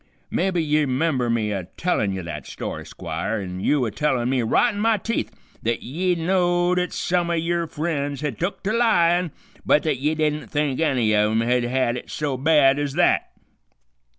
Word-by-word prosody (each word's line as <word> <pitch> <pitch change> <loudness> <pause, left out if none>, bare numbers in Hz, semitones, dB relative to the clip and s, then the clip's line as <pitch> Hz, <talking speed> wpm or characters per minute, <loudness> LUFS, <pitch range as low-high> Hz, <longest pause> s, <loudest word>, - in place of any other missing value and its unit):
Mebby 180 -2 0
ye 150 -1 +2
'member 130 -2 0
me 110 -2 0
a 95 -3 -3
tellin' 160 - 0
ye 95 -1 -4
that 75 -5 -7
story, - - -6
Squire, 85 +7 -4
an' 90 -2 -5
you 135 +6 +2
a 110 - -3
tellin' 125 0 0
me 130 -2 +1
right 210 - +2
in 205 - -5
my 225 0 +3
teeth 230 +3 -2 0.3
th't 115 +1 -1
ye 175 +8 0
know'd 175 +1 +2
th't 180 -1 -1
some 175 -1 0
o' - - +1
yer 170 +1 0
friends 145 -3 -3
had 150 -6 -3
took 185 +3 -3
to 205 +2 0
lyin', 180 -7 +3 0.3
but 150 - +3
th't 150 -5 0
ye 150 +3 0
didn't 150 -1 -1
think 145 -3 -1
any 130 -9 +2
of 105 0 +3
'em 110 +1 +1
had 125 +1 +1
it - - -9
so 145 -3 -2
bad 140 0 +4
ez 145 -2 -2
that. - - +2
150 Hz, 190 wpm, -23 LUFS, 120-170 Hz, 0.3 s, bad